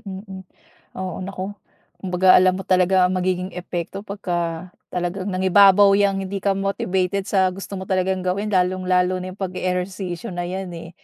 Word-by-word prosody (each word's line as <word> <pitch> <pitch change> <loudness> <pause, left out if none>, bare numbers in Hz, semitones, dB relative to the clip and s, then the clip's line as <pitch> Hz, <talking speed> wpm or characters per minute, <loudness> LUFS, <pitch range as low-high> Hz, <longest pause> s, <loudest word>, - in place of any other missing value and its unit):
hmm. 190 0 -8 0.6
Oo 185 0 -4
nako, 190 +1 -5 0.5
kumbaga 185 0 +3
alam 185 0 +3
mo 190 - -6
talaga 185 0 +3
ang 180 - +1
magiging 185 0 -1
epekto 180 +1 -5
pagka, 180 -4 -4 0.2
talagang 180 +2 -3
nangibabaw 195 +1 +5
yang 195 -1 +2
hindi 195 +1 -4
ka 195 0 +1
motivated 195 -1 -1
sa 190 -2 +2
gusto 195 +1 -7
mo 190 - -5
talagang 190 0 0
gawin 195 +3 -1
lalong 185 -1 0
lalo 185 0 +2
na 185 - -5
yung - - -21
pag-eehersisyo 185 +1 -3
na 175 0 -3
yan, 190 0 -5
eh. 165 0 -8
185 Hz, 165 wpm, -22 LUFS, 180-195 Hz, 0.6 s, nangibabaw